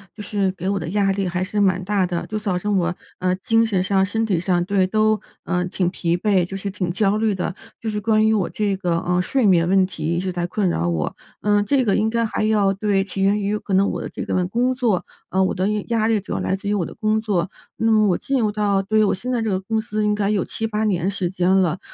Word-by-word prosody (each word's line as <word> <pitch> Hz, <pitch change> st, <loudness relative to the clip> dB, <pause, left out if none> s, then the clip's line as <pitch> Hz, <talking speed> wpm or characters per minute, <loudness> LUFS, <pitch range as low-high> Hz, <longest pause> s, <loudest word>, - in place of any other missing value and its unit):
就 210 Hz, -, -8 dB
是 200 Hz, -2 st, 0 dB
给 185 Hz, +1 st, -4 dB
我 200 Hz, -, 0 dB
的 165 Hz, -, -5 dB
压 200 Hz, 0 st, +2 dB
力 195 Hz, -1 st, -1 dB
还 180 Hz, +1 st, -1 dB
是 205 Hz, +2 st, -2 dB
蛮 185 Hz, -2 st, +2 dB
大 195 Hz, -1 st, +1 dB
的， 175 Hz, -1 st, -3 dB
就 215 Hz, -, -3 dB
造 205 Hz, -4 st, -1 dB
成 200 Hz, +2 st, 0 dB
我， 175 Hz, 0 st, 0 dB, 0.2 s
呃， 185 Hz, 0 st, 0 dB
精 225 Hz, +3 st, +2 dB
神 195 Hz, -5 st, 0 dB
上、 190 Hz, 0 st, +2 dB
身 225 Hz, +3 st, -1 dB
体 180 Hz, -5 st, +1 dB
上， 175 Hz, -1 st, +1 dB
对， 195 Hz, -1 st, +2 dB
都， 215 Hz, +1 st, +2 dB, 0.3 s
呃， 180 Hz, 0 st, 0 dB
挺 180 Hz, 0 st, -1 dB
疲 170 Hz, -2 st, -1 dB
惫， 185 Hz, -1 st, +2 dB
就 195 Hz, -, -7 dB
是 195 Hz, +1 st, -4 dB
挺 185 Hz, -2 st, -3 dB
焦 200 Hz, +2 st, +1 dB
虑 220 Hz, -1 st, +1 dB
的， 185 Hz, -1 st, -3 dB, 0.3 s
就 225 Hz, -, -3 dB
是 210 Hz, -1 st, -2 dB
关 215 Hz, +1 st, +3 dB
于 -, -, +3 dB
我 190 Hz, -5 st, 0 dB
这 205 Hz, -2 st, 0 dB
个， 175 Hz, -3 st, 0 dB
呃， 180 Hz, +1 st, 0 dB
睡 235 Hz, +5 st, +1 dB
眠 170 Hz, -3 st, +4 dB
问 190 Hz, +1 st, +4 dB
题 160 Hz, -4 st, -8 dB
一 170 Hz, +2 st, 0 dB
直 185 Hz, +1 st, -2 dB
在 175 Hz, -1 st, -2 dB
困 185 Hz, +1 st, 0 dB
扰 85 Hz, -, 0 dB
我。 80 Hz, -3 st, -1 dB, 0.3 s
呃， 205 Hz, 0 st, +2 dB
这 260 Hz, +6 st, +2 dB
个 205 Hz, -5 st, +2 dB
应 215 Hz, +1 st, +2 dB
该 230 Hz, +1 st, 0 dB
还 215 Hz, -, -1 dB
要 210 Hz, -2 st, +3 dB
对， 195 Hz, 0 st, +1 dB
起 195 Hz, 0 st, -3 dB
源 205 Hz, +2 st, +3 dB
于 205 Hz, +1 st, -1 dB
可 200 Hz, -, -5 dB
能 195 Hz, +1 st, +4 dB
我 -, -, -3 dB
的 -, -, -5 dB
这 -, -, -6 dB
个 180 Hz, -1 st, 0 dB
工 245 Hz, +7 st, 0 dB
作， 230 Hz, -8 st, 0 dB, 0.3 s
呃， 190 Hz, +1 st, +2 dB
我 185 Hz, -, 0 dB
的 185 Hz, +1 st, 0 dB, 0.2 s
压 225 Hz, -2 st, +1 dB
力 225 Hz, -2 st, +2 dB
主 200 Hz, -, -6 dB
要 -, -, -1 dB
来 190 Hz, -, 0 dB
自 200 Hz, +1 st, -5 dB
于 210 Hz, -, +1 dB
我 185 Hz, -4 st, 0 dB
的 -, -, -8 dB
工 215 Hz, 0 st, 0 dB
作。 195 Hz, -5 st, -1 dB, 0.3 s
那 225 Hz, 0 st, +2 dB
么 215 Hz, -1 st, +4 dB
我 180 Hz, -, +3 dB
进 275 Hz, -1 st, -1 dB
入 215 Hz, -3 st, +1 dB
到 205 Hz, -2 st, +1 dB
对， 215 Hz, +2 st, +2 dB
我 -, -, +1 dB
现 250 Hz, +7 st, -4 dB
在 240 Hz, -2 st, 0 dB
这 225 Hz, -, -1 dB
个 190 Hz, -2 st, 0 dB
公 220 Hz, +3 st, -1 dB
司 215 Hz, -1 st, -2 dB
应 210 Hz, -, +2 dB
该 205 Hz, -1 st, 0 dB
有 210 Hz, -3 st, +1 dB
7-8 220 Hz, -1 st, -2 dB
年 190 Hz, -3 st, +1 dB
时 185 Hz, -3 st, -2 dB
间 180 Hz, -1 st, 0 dB
了。 185 Hz, -2 st, +2 dB
195 Hz, 295 characters per minute, -21 LUFS, 185-215 Hz, 0.3 s, 眠